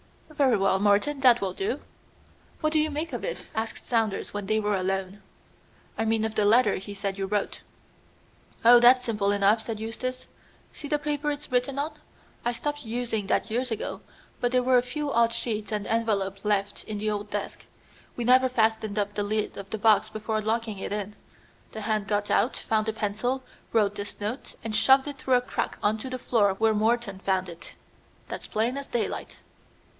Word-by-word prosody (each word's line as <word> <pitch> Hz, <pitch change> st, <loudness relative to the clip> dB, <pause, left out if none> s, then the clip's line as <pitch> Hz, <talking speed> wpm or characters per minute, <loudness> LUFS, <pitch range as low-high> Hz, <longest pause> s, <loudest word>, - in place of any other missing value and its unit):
"Very 275 Hz, -6 st, +3 dB
well, 195 Hz, -1 st, +2 dB
Morton, 205 Hz, +8 st, +2 dB
that 250 Hz, -3 st, +6 dB
will 190 Hz, -2 st, -1 dB
do." 395 Hz, +3 st, -2 dB, 0.8 s
"What 310 Hz, 0 st, +1 dB
do 310 Hz, -, +4 dB
you 310 Hz, 0 st, +1 dB
make 310 Hz, +3 st, -4 dB
of -, -, -4 dB
it?" -, -, -4 dB
asked 220 Hz, 0 st, -4 dB
Saunders 225 Hz, -4 st, 0 dB
when 205 Hz, -1 st, -4 dB
they 215 Hz, +1 st, +2 dB
were 210 Hz, -1 st, 0 dB
alone. 190 Hz, +1 st, -2 dB, 0.7 s
"I 225 Hz, -, -1 dB
mean 220 Hz, 0 st, +1 dB
of 220 Hz, -, -3 dB
the 210 Hz, -, +2 dB
letter 220 Hz, 0 st, +4 dB
he 200 Hz, +2 st, -8 dB
said 195 Hz, -1 st, -3 dB
you 195 Hz, -, -1 dB
wrote." 205 Hz, 0 st, -2 dB, 1.0 s
"Oh, 240 Hz, +1 st, +9 dB
that's 250 Hz, +1 st, +7 dB
simple 210 Hz, -4 st, 0 dB
enough," 205 Hz, +2 st, +3 dB
said 220 Hz, -1 st, -5 dB
Eustace. 255 Hz, +3 st, -4 dB, 0.5 s
"See 290 Hz, -, -8 dB
the 295 Hz, -, +1 dB
paper 295 Hz, 0 st, -2 dB
it's 295 Hz, -1 st, -5 dB
written 250 Hz, +2 st, +1 dB
on? 295 Hz, +3 st, -1 dB, 0.5 s
I 240 Hz, -, 0 dB
stopped 290 Hz, +4 st, -4 dB
using 225 Hz, -3 st, -2 dB
that 215 Hz, -, 0 dB
years 250 Hz, +3 st, 0 dB
ago, 225 Hz, -, -4 dB, 0.4 s
but 245 Hz, -, 0 dB
there 250 Hz, 0 st, +3 dB
were 255 Hz, 0 st, +5 dB
a -, -, +1 dB
few 285 Hz, +4 st, -4 dB
odd 235 Hz, -2 st, +3 dB
sheets 230 Hz, -2 st, -3 dB
and 210 Hz, -1 st, -2 dB
envelopes 200 Hz, -4 st, 0 dB
left 205 Hz, -1 st, 0 dB
in 215 Hz, -, -4 dB
the 215 Hz, +1 st, -1 dB
old 205 Hz, 0 st, -3 dB
desk. 205 Hz, -1 st, -4 dB, 0.5 s
We 240 Hz, -, -3 dB
never 255 Hz, +2 st, +5 dB
fastened 220 Hz, -3 st, +1 dB
up 205 Hz, 0 st, 0 dB
the 205 Hz, -, -2 dB
lid 210 Hz, +1 st, -1 dB
of 195 Hz, 0 st, -8 dB
the 220 Hz, -, -3 dB
box 215 Hz, 0 st, +4 dB
before 215 Hz, 0 st, -2 dB
locking 220 Hz, -1 st, -1 dB
it -, -, -5 dB
in. 205 Hz, 0 st, -3 dB, 0.6 s
The 220 Hz, -, -5 dB
hand 215 Hz, -1 st, -1 dB
got 205 Hz, 0 st, 0 dB
out, 245 Hz, -, +2 dB
found 220 Hz, 0 st, 0 dB
a -, -, -1 dB
pencil, 220 Hz, +5 st, -2 dB, 0.3 s
wrote 210 Hz, -3 st, +3 dB
this 205 Hz, 0 st, -7 dB
note, 215 Hz, +6 st, -5 dB
and 220 Hz, -1 st, -3 dB
shoved 265 Hz, +5 st, +5 dB
it 285 Hz, -1 st, -6 dB
through 260 Hz, -1 st, +2 dB
a 245 Hz, -, +4 dB
crack 250 Hz, -, -3 dB
on 215 Hz, +1 st, +2 dB
to 260 Hz, -, -6 dB
the 255 Hz, -, -3 dB
floor 210 Hz, -6 st, +2 dB
where 220 Hz, +2 st, +3 dB
Morton 215 Hz, -2 st, 0 dB
found 190 Hz, -1 st, 0 dB
it. 170 Hz, -1 st, -10 dB, 0.6 s
That's -, -, -6 dB
plain 230 Hz, +4 st, 0 dB
as 280 Hz, -, -5 dB
daylight." 235 Hz, -, -3 dB
220 Hz, 200 wpm, -27 LUFS, 205-250 Hz, 1.0 s, Oh